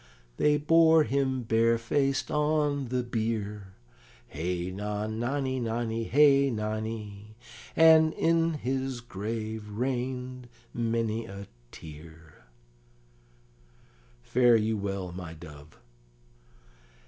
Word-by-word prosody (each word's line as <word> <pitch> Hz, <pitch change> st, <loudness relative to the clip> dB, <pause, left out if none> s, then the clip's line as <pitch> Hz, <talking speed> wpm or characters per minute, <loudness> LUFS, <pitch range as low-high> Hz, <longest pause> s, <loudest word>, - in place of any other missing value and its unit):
"They 150 Hz, 0 st, +3 dB
bore 160 Hz, +1 st, +5 dB
him 135 Hz, -2 st, -1 dB
barefaced 115 Hz, +4 st, +1 dB
on 150 Hz, -2 st, +1 dB
the 125 Hz, +1 st, -1 dB
bier; 105 Hz, -4 st, -3 dB, 0.5 s
Hey 90 Hz, +3 st, -3 dB
non 105 Hz, +2 st, -4 dB
nonny, 130 Hz, +1 st, -1 dB
nonny, 115 Hz, -1 st, -2 dB
hey 140 Hz, +1 st, +5 dB
nonny; 110 Hz, -2 st, -5 dB, 0.4 s
And 160 Hz, 0 st, +6 dB
in 165 Hz, 0 st, +2 dB
his 130 Hz, -2 st, -3 dB
grave 110 Hz, -1 st, -5 dB
rain'd 125 Hz, +2 st, -4 dB, 0.2 s
many 115 Hz, -1 st, -1 dB
a 100 Hz, -1 st, -8 dB, 0.3 s
tear: 80 Hz, 0 st, -13 dB, 1.8 s
"Fare 120 Hz, -, +4 dB
you 110 Hz, 0 st, +1 dB
well, 100 Hz, -3 st, -4 dB
my 85 Hz, -2 st, -8 dB
dove." 75 Hz, -2 st, -13 dB
115 Hz, 90 wpm, -28 LUFS, 105-135 Hz, 1.8 s, And